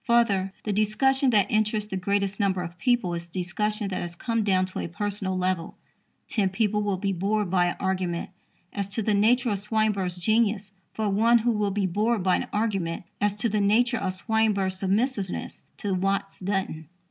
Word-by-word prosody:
Further, 205 -5 +3
the 210 - -1
discussion 255 +6 +2
that 205 -5 +3
interests 215 0 0
the - - -1
greatest 200 +1 -1
number 190 -3 +1
of 175 0 -8
people 240 -7 +1
is 170 0 -5
discussion 200 +4 -2
that 185 - -3
has 175 0 -5
come 230 +4 -1
down 185 -2 +2
to 185 - -6
a - - -3
personal 195 +1 -1
level. 180 -2 -2 0.5
Ten 200 -4 +1
people 210 +1 0
will 205 -2 0
be 195 +1 -1
bored 200 +1 0
by 180 -2 +3
an 175 - -2
argument 185 -2 -2 0.4
as 200 -2 -2
to 200 +3 -1
the 215 - +1
nature 235 +4 +3
of 200 - -1
Swinburne's 210 -4 0
genius 210 +1 +1 0.2
for 220 -1 -2
one 225 +4 +4
who 240 - +4
will 210 -2 0
be 200 0 0
bored 210 +3 0
by 185 -1 +3
an - - -4
argument 195 -7 -1 0.2
as 205 -1 +2
to 210 +3 0
the 210 -1 0
nature 235 +5 +3
of 190 -2 -1
Swinburne's 200 -2 +1
submissiveness 200 0 -1 0.2
to 200 -2 -2
Watts 195 +1 -1
Dunton. 185 -5 -2
200 Hz, 190 wpm, -26 LUFS, 185-215 Hz, 0.5 s, one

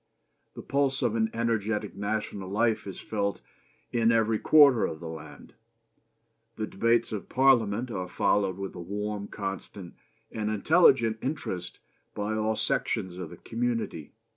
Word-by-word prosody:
The - - -8
pulse 140 -1 +1
of 115 - +1
an 110 -1 +1
energetic 110 -2 -1
national 100 -2 -3
life 110 +1 +1
is 95 - -7
felt 100 -2 -2 0.5
in 115 -1 +3
every 110 -1 +2
quarter 145 -6 +6
of 80 - -6
the 85 - -7
land. 80 -1 -10 1.0
The 110 - -2
debates 115 +3 +1
of 105 -3 -5
Parliament 120 -3 +3
are 90 -4 -3
followed 95 +1 +1
with 100 -1 -5
a 90 - -7
warm, 105 +3 -4
constant, 95 -2 -6 0.4
and 105 -1 -2
intelligent 115 - +4
interest 125 - -4 0.4
by 105 +1 -2
all 110 0 0
sections 90 -3 -1
of 90 -4 -5
the - - -11
community. 115 -9 -3
110 Hz, 140 wpm, -28 LUFS, 100-115 Hz, 1.0 s, quarter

